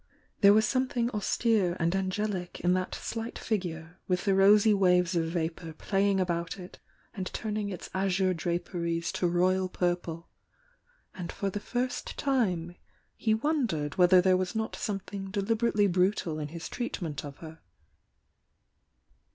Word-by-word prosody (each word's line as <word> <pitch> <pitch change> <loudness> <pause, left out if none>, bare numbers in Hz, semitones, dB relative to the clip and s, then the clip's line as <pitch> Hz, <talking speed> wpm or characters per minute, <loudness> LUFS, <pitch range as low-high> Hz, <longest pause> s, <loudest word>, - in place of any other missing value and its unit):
There 200 -1 +7
wa.s 220 +1 +4
something 255 -2 0
austere 210 -3 +1
and 170 +2 +1
angelic 190 -1 -2
in 180 +1 +3
that 185 0 -1
slight 225 +1 -5
figure 175 -5 -4
with 180 +1 0
the 195 - +3
rosy 205 +3 +6
waves 180 -2 +3
of 165 -1 +2
vapour 165 0 -3
playing 195 +3 +1
about 170 -1 -1
it 180 -1 -11 0.3
and 190 -5 -4
turning 210 -1 -3
its 185 - -6
azure 190 0 +1
draperies 170 0 -2
to 180 - 0
royal 185 +2 +2
purple, 175 -2 -2 0.9
and 180 -2 -6
for 200 -1 -3
the 205 - -3
first 245 +4 -3
time 185 - 0 0.4
he 220 -1 +1
wondered 220 - -1
whether 180 0 +7
there 185 0 +4
was 185 +1 -2
not 220 0 -2
something 195 -1 -4
deliberately 210 +1 +1
brutal 180 -3 +1
in 150 - -3
his 165 +2 -7
treatment 175 - -4
of 145 -1 -8
her. 160 0 -10
185 Hz, 145 wpm, -29 LUFS, 175-210 Hz, 0.9 s, There